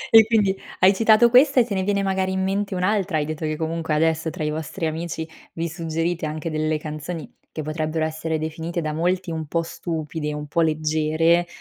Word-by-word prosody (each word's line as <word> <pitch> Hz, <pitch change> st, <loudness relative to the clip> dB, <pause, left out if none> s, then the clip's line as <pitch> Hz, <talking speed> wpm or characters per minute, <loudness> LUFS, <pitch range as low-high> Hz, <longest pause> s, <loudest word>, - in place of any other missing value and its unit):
E 220 Hz, -1 st, +9 dB
quindi, 210 Hz, -4 st, +3 dB, 0.3 s
hai 190 Hz, +2 st, +7 dB
citato 225 Hz, +3 st, +5 dB
questa 270 Hz, +2 st, +6 dB
e 240 Hz, -, +5 dB
te 220 Hz, -, -4 dB
ne 190 Hz, -, 0 dB
viene 200 Hz, +1 st, +1 dB
magari 190 Hz, -1 st, 0 dB
in 190 Hz, 0 st, 0 dB
mente 195 Hz, +1 st, -1 dB
un'altra, 185 Hz, -2 st, +1 dB
hai 150 Hz, -, 0 dB
detto, 155 Hz, +1 st, -4 dB
che 155 Hz, 0 st, -1 dB
comunque 160 Hz, 0 st, -2 dB
adesso, 160 Hz, +1 st, +1 dB
tra 160 Hz, 0 st, -5 dB
i 150 Hz, -, 0 dB
vostri 160 Hz, +3 st, -4 dB
amici, 160 Hz, 0 st, -3 dB, 0.3 s
vi 165 Hz, +1 st, -2 dB
suggerite 165 Hz, 0 st, -2 dB
anche 155 Hz, +2 st, -4 dB
delle 155 Hz, 0 st, 0 dB
canzoni 155 Hz, +2 st, -6 dB, 0.2 s
che 155 Hz, -, -5 dB
potrebbero 155 Hz, +1 st, -1 dB
essere 160 Hz, 0 st, -2 dB
definite 160 Hz, +2 st, -4 dB
da 155 Hz, -2 st, -2 dB
molti 180 Hz, +3 st, 0 dB
un 160 Hz, -1 st, -4 dB
po' 165 Hz, +3 st, 0 dB
stupide, 160 Hz, -2 st, -4 dB
un 150 Hz, 0 st, -5 dB
po' 165 Hz, +3 st, 0 dB
leggere, 155 Hz, +2 st, +2 dB
165 Hz, 200 wpm, -23 LUFS, 155-185 Hz, 0.3 s, E